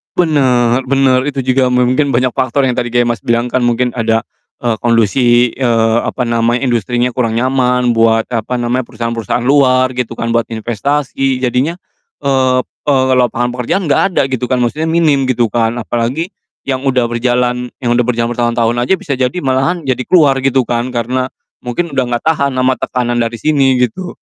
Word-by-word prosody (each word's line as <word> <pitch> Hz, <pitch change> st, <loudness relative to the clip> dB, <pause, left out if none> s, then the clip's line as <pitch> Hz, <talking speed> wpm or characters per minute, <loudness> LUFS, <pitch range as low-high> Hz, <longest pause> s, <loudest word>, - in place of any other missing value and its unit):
Bener 130 Hz, -7 st, +2 dB
bener, 135 Hz, 0 st, +2 dB
itu 135 Hz, -2 st, -2 dB
juga 130 Hz, 0 st, +2 dB
mungkin 125 Hz, +3 st, +2 dB
banyak 125 Hz, 0 st, +1 dB
faktor 130 Hz, +2 st, 0 dB
yang 130 Hz, -, +2 dB
tadi 120 Hz, 0 st, -2 dB
kayak 120 Hz, 0 st, +1 dB
Mas 120 Hz, -2 st, -1 dB
bilang 120 Hz, +4 st, -1 dB
kan, 130 Hz, -, +1 dB
mungkin 120 Hz, +1 st, +1 dB
ada, 115 Hz, -1 st, 0 dB, 0.4 s
eee, 120 Hz, -2 st, +1 dB
kondisi, 120 Hz, +1 st, +2 dB
eee, 115 Hz, -3 st, +1 dB
apa 125 Hz, -, -2 dB
namanya, 115 Hz, +2 st, 0 dB
industrinya 120 Hz, 0 st, 0 dB
kurang 115 Hz, -2 st, -1 dB
nyaman 125 Hz, 0 st, +1 dB
buat, 115 Hz, -1 st, +3 dB
apa 115 Hz, +1 st, -2 dB
namanya, 120 Hz, 0 st, -1 dB
perusahaan-perusahaan 115 Hz, 0 st, -3 dB
luar, 130 Hz, -1 st, +3 dB
gitu 125 Hz, -2 st, -4 dB
kan, 115 Hz, 0 st, -3 dB
buat 115 Hz, 0 st, 0 dB
investasi, 130 Hz, +3 st, -2 dB
jadinya, 130 Hz, +7 st, 0 dB, 0.5 s
eee, 130 Hz, -2 st, +2 dB
p -, -, -35 dB
eee, 130 Hz, -2 st, +2 dB
lapangan 120 Hz, -1 st, +1 dB
pekerjaan 125 Hz, +10 st, -2 dB
nggak -, -, +3 dB
ada -, -, +4 dB
gitu 125 Hz, -1 st, -2 dB
kan, 125 Hz, 0 st, 0 dB
maksudnya 155 Hz, +7 st, -1 dB
minim 155 Hz, -5 st, +2 dB
gitu 120 Hz, -4 st, 0 dB
kan, 115 Hz, 0 st, 0 dB
apalagi 125 Hz, -, -2 dB, 0.3 s
yang 135 Hz, 0 st, -3 dB
udah 125 Hz, -2 st, +2 dB
berjalan 125 Hz, +1 st, 0 dB, 0.2 s
yang 120 Hz, -, +1 dB
udah 120 Hz, -, +2 dB
berjalan 120 Hz, -1 st, 0 dB
bertahun-tahun 120 Hz, 0 st, 0 dB
aja -, -, +3 dB
bisa 145 Hz, -5 st, -4 dB
jadi 130 Hz, +6 st, 0 dB
malahan 135 Hz, +6 st, 0 dB
jadi 130 Hz, -2 st, -1 dB
keluar 145 Hz, -7 st, +4 dB
gitu 135 Hz, -1 st, +1 dB
kan, 120 Hz, +1 st, -3 dB
karena 130 Hz, +2 st, -1 dB, 0.3 s
mungkin 155 Hz, +8 st, -3 dB
udah 130 Hz, -3 st, 0 dB
nggak -, -, -4 dB
tahan 140 Hz, -4 st, 0 dB
ama 130 Hz, 0 st, +1 dB
tekanan 120 Hz, -1 st, -1 dB
dari 115 Hz, 0 st, -1 dB
sini, 135 Hz, -2 st, +2 dB
gitu 180 Hz, +10 st, -3 dB
125 Hz, 180 wpm, -14 LUFS, 120-130 Hz, 0.5 s, ada